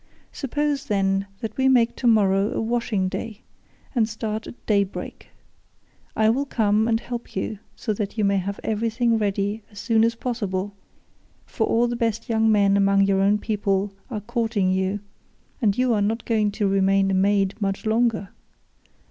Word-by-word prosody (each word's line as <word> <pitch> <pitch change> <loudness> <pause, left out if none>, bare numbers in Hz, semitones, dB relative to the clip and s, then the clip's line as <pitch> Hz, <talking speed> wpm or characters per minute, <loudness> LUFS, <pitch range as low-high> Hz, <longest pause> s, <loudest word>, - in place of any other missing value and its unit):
Suppose, 285 +1 -2
then, 195 -1 +1
that 225 - -5
we 265 0 +3
make 240 -3 +3
tomorrow 205 -4 +3
a - - 0
washing 225 -4 0
day, 220 +3 -5 0.5
and 230 -4 +2
start 220 0 -4
at - - -12
daybreak. 200 -2 -1 0.9
I 220 - +3
will 275 +4 -1
come 215 -2 +2
and 225 -1 +2
help 240 0 -7
you 195 +2 -3 0.2
so 215 - -2
that 205 +1 -4
you 210 - +2
may 200 0 +2
have 195 +1 -3
everything 225 +1 0
ready 205 +1 -1
as 205 - -17
soon 225 0 +2
as 230 0 +2
possible, 205 -5 -3 0.7
for - - -1
all 235 +1 +2
the 240 - -2
best 230 -1 -1
young 225 -1 +3
men 200 -2 +4
among 195 0 +4
your 195 -1 +2
own 200 +2 +3
people 200 -2 -1 0.2
are 215 -5 -4
courting 225 -4 0
you, 190 +2 -1 0.6
and 205 -3 +2
you 250 -1 +2
are 210 - +1
not 225 +3 -1
going 215 -3 +1
to 210 -1 0
remain 195 0 +2
a - - +1
maid 195 0 +2
much 195 +1 -2
longer. 220 -2 +1
215 Hz, 170 wpm, -23 LUFS, 195-230 Hz, 0.9 s, men